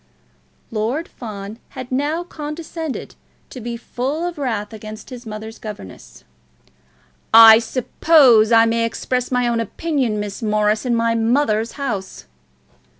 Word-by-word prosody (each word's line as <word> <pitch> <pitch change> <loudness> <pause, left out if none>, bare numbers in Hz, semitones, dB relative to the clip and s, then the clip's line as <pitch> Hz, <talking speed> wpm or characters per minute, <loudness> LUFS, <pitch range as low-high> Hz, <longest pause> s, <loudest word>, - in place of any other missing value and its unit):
Lord 230 +9 -2
Fawn 210 -1 -8 0.2
had 255 0 -7
now 295 +6 -1
condescended 315 -1 -6 0.4
to 255 - -8
be 235 +1 -5
full 270 +7 -3
of 345 -3 -5
wrath 225 -6 -3
against 215 +3 -10
his 245 -2 -9
mother's 220 +1 -8
governess. 205 - -10 1.1
"I 225 0 +10
suppose 250 -2 +4
I 225 0 +6
may 230 0 +1
express 250 +2 -2
my 250 -1 +1
own 235 -1 0
opinion, 245 - -1
Miss 205 +2 -5
Morris, 215 +1 +1
in 240 - +2
my 230 0 +1
mother's 230 -1 +1
house." 215 - -5
230 Hz, 130 wpm, -20 LUFS, 215-270 Hz, 1.1 s, I